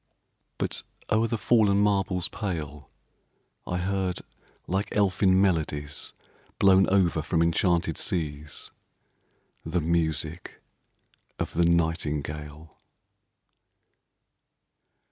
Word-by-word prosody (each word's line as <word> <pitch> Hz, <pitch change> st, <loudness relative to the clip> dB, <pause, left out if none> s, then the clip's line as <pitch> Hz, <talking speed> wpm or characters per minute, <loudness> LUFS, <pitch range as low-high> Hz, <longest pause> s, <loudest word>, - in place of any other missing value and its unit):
But -, -, -2 dB, 0.3 s
o'er 110 Hz, +2 st, +3 dB
the 115 Hz, -, -1 dB
fallen 105 Hz, -3 st, +3 dB
marbles 100 Hz, -3 st, +1 dB
pale 75 Hz, -, -5 dB, 0.8 s
I 90 Hz, -, -1 dB
heard, 95 Hz, 0 st, -1 dB, 0.4 s
like 95 Hz, +3 st, -1 dB
elfin 95 Hz, -2 st, +3 dB
melodies 75 Hz, -6 st, -1 dB, 0.4 s
Blown 95 Hz, -1 st, +5 dB
over 90 Hz, -5 st, +3 dB
from 80 Hz, +2 st, +1 dB
enchanted 85 Hz, +1 st, +1 dB
seas, 75 Hz, -3 st, -2 dB, 0.9 s
The 80 Hz, +2 st, -1 dB
music 80 Hz, 0 st, -1 dB, 0.8 s
of -, -, -3 dB
the 85 Hz, -, +3 dB
nightingale. 75 Hz, -2 st, -1 dB
85 Hz, 85 wpm, -27 LUFS, 80-95 Hz, 0.9 s, Blown